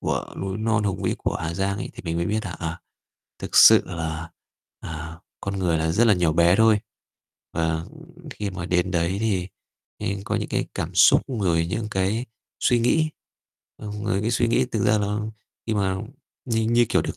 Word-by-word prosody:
của - - -3
núi 95 +1 -3
non 110 0 +1
hùng 95 -1 -2
vĩ 95 - 0
của - - -2
Hà 80 +1 -4
Giang 100 +2 -1
ấy, - - -5
thì - - -9
mình 85 -1 -2
mới 85 0 0
biết 110 +2 -1
là, 95 - -4
à, 85 -1 -5 0.6
thực - - -5
sự - - +9
là, 80 -1 -4 0.5
à, 80 0 -7 0.2
con 100 0 -3
người 85 -3 +1
là 80 +1 0
rất 115 +6 +4
là 105 - +6
nhỏ 85 -3 +2
bé 85 +3 +4
thôi. 110 -1 +5 0.7
Và 80 0 -1 0.5
khi 105 -1 -4
mà 90 -2 -5
đến 90 0 +1
đấy 85 +1 0
thì 95 -5 0 0.5
nên 100 0 -3
có - - -1
những - - -3
cái - - -1
cảm - - -4
xúc, - - +7
rồi 90 -9 +1
những 110 +4 -2
cái 100 +5 0 0.3
suy 120 - +3
nghĩ, 155 +6 +2 0.7
ờm, 105 0 -7
ờ, 105 -3 0
cái 110 - 0
suy 120 0 +2
nghĩ 125 +3 +3
thực 110 -3 0
ra 105 +1 +4
nó 105 +1 -1 0.4
khi 110 - 0
mà 95 -2 0 0.5
như 115 -2 +1
như, 120 +2 +3
kiểu, - - +2
được - - -5
95 Hz, 205 wpm, -24 LUFS, 85-110 Hz, 0.7 s, sự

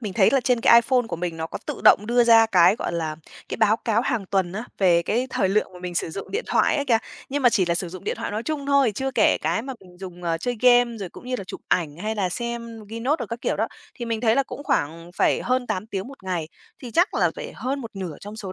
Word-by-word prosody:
mình 210 -5 -4
thấy 190 -1 +4
là 270 - +3
trên 245 -1 +1
cái - - +6
iPhone 245 0 +1
của - - -3
mình 170 -1 -4
nó 160 0 -3
có - - -6
tự - - -5
động 210 - +6
đưa 240 +1 +3
ra 225 -1 +7
cái, 185 -1 +5
gọi - - -3
là, 160 -2 -3 0.3
cái - - -4
báo 220 0 +3
cáo 225 -1 0
hàng 240 -7 -1
tuần 185 -2 0
á, 215 +5 -4
về 175 -3 +4
cái 240 +8 0
thời 190 - +1
lượng 200 0 0
mà 180 - -11
mình 180 -1 -5
sử 165 - -1
dụng 195 +4 -7
điện 440 +5 -2
thoại - - +2
ấy 285 - -1
kìa. 235 -5 +3 0.3
Nhưng 285 +1 -2
mà 250 - +7
chỉ 190 -6 +2
là 170 - +1
sử 175 +1 -3
dụng 185 +1 -10
điện - - -1
thoại - - -4
nói 210 +2 -3
chung 290 0 -3
thôi, 280 -5 +3
chưa 265 +5 -2
kể 260 - +3
cái 225 - 0
mà 265 +2 -5
mình 180 -2 -17
dùng, 180 -2 -9
ờ, 165 -1 -1
chơi 245 +8 -2
game, 245 -1 +5
rồi 195 -3 -5
cũng 245 - -13
như 255 - -2
là 195 - -6
chụp - - -8
ảnh 155 -5 0
hay 215 +5 -3
là 200 -4 0
xem 235 +1 -5
ghi 225 +2 -6
note 270 +6 +1
đồ - - -4
các 230 0 -6
kiểu - - -1
đó, - - 0 0.3
thì 240 - -6
mình 230 -2 -2
thấy 225 -2 +3
là 275 - +4
cũng 280 - -8
khoảng 165 - -1
phải - - +2
hơn 255 0 0
8 185 -1 -3
tiếng 200 0 -5
một 275 -5 -13
ngày, 175 -4 -2 0.3
thì 245 - -7
chắc 345 - +2
là - - +2
phải - - -7
hơn 270 +2 -3
một 230 -3 -7
nửa 180 -6 -5
trong 205 +1 -9
số 200 -4 -6
220 Hz, 295 wpm, -24 LUFS, 180-245 Hz, 0.3 s, ra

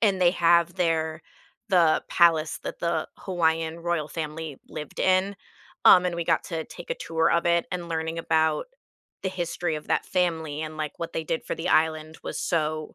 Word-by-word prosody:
and 200 -4 +2
they 175 - +6
have 170 -1 +3
there 160 -3 0 0.5
the 175 -5 +4
palace 165 -3 +3
that - - -6
the 170 0 -1
Hawaiian 165 -2 0
royal 170 -3 -1
family 155 -2 -5
lived 150 -2 -7
in, 185 +2 +2 0.5
um, 180 -1 +8
and 180 -1 0
we 170 - -2
got - - +1
to 165 -2 -4
take 175 - -11
a - - +1
tour 160 0 0
of 170 0 +2
it. 170 0 +2
And 175 -1 -4
learning 160 0 -2
about 160 -2 +1 0.6
the 190 - +1
history 175 -2 -2
of 150 0 -7
that - - +1
family 160 -4 -1
and, 155 0 -6
like, 155 -1 -4
what 170 - -5
they 160 - -3
did 160 - -2
for - - -4
the 165 - -3
island 155 0 +1
was - - -4
so 155 -2 -1
165 Hz, 190 wpm, -26 LUFS, 160-175 Hz, 0.6 s, um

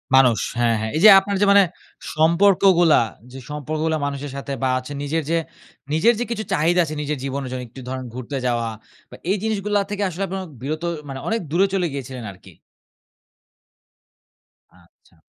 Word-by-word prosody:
মানুষ। 125 -4 +5 0.2
হ্যাঁ, 115 -1 +3
হ্যাঁ। 110 0 -3
এই 160 - 0
যে 215 - +11
আপনার 200 +1 -3
যে 205 - +5
মানে 200 0 +7 0.5
সম্পর্কগুলা; 175 0 +4 0.3
যে 135 - -9
সম্পর্কগুলা 155 +2 -2
মানুষের 140 0 -4
সাথে 140 0 -5
বা 130 - +2
আছে 130 +3 -10
নিজের 155 +2 -1
যে, 165 - +2 0.6
নিজের 225 +10 +4
যে 240 - +1
কিছু 220 -2 -2
চাহিদা 170 +4 +2
আছে, 155 0 -5
নিজের 150 0 -2
জীবনের 135 -1 -3
জন্য 130 - -4
একটু 130 +3 -11
ধরেন 130 0 -4
ঘুরতে 130 +3 -5
যাওয়া 120 -2 0 0.4
বা - - -11 0.2
এই 205 - +2
জিনিসগুলা 210 -1 0
থেকে 205 0 -2
আসলে 185 +3 -4
আপনার 190 0 -4 0.2
বিরত 155 +5 -4 0.3
মানে 135 - -5
অনেক 225 +1 0
দূরে 190 +4 +3
চলে 180 -3 +1
গিয়েছিলেন 130 -3 -6
আরকি? 90 - -16 2.3
আচ্ছা। - - -28
155 Hz, 170 wpm, -22 LUFS, 135-190 Hz, 2.3 s, যে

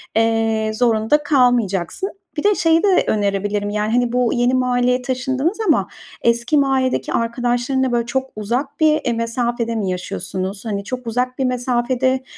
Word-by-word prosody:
eee, 225 -1 +1
zorunda 230 +5 +2
kalmayacaksın. 245 - +1 0.3
Bir 300 - -1
de 415 0 +4
şeyi 330 0 +3
de 390 -3 +4
önerebilirim: 205 0 0
Yani, 210 +1 -1
hani, 245 -1 +2
bu 250 -2 +2
yeni 245 0 +2
mahalleye 250 0 +1
taşındınız 265 +7 -1
ama 315 - +3 0.3
eski 235 +5 +2
mahalledeki 265 -2 +1
arkadaşlarınla, 245 +2 0
böyle, 235 -1 0
çok 265 +2 -2
uzak 245 +7 -3
bir, 310 -1 +5
eee, 240 - +1
mesafede 230 0 -2
mi 205 -4 -1
yaşıyorsunuz? 185 +2 -4
Hani, 200 -3 -3
çok 250 +3 -6
uzak 250 +3 -2
bir 265 - +1
mesafede 255 +1 0
245 Hz, 150 wpm, -19 LUFS, 225-260 Hz, 0.3 s, bir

